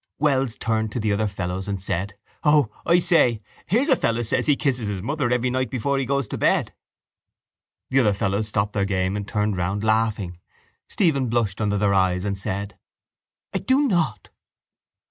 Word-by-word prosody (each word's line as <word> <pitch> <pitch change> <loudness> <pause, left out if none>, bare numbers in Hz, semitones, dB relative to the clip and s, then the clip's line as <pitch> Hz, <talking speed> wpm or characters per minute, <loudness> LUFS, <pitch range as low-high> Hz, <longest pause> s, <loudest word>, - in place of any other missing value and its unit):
Wells 135 -5 +1
turned 110 -1 -1
to - - -2
the 105 -2 0
other 105 +1 0
fellows 95 -1 -4
and 100 -1 -2
said: 95 +1 -3 0.3
—O, 150 -7 +4 0.2
I 170 - +5
say, 165 - +3 0.3
here's 245 - +2
a 270 - +5
fellow 115 - 0
says 125 +2 0
he 145 - +5
kisses 125 -6 -1
his 100 -3 -4
mother 145 0 -1
every 125 +1 +1
night 130 0 -1
before 135 +2 -1
he 135 - -2
goes 140 -3 0
to - - -4
bed. - - +2 1.2
The 135 - +4
other 105 -5 +3
fellows 100 +2 -1
stopped 105 -1 -1
their 100 - +1
game 95 -1 0
and 100 -1 -4
turned 105 -2 -1
round, 95 +4 -1
laughing. 110 -5 0 0.5
Stephen 140 -9 +1
blushed 110 -4 0
under 105 -1 +1
their 100 -1 +2
eyes 95 -1 +2
and 100 -1 -1
said: 100 0 -5 0.7
—I - - 0
do 275 +2 +2
not. 175 -8 -1
110 Hz, 185 wpm, -23 LUFS, 100-135 Hz, 1.2 s, I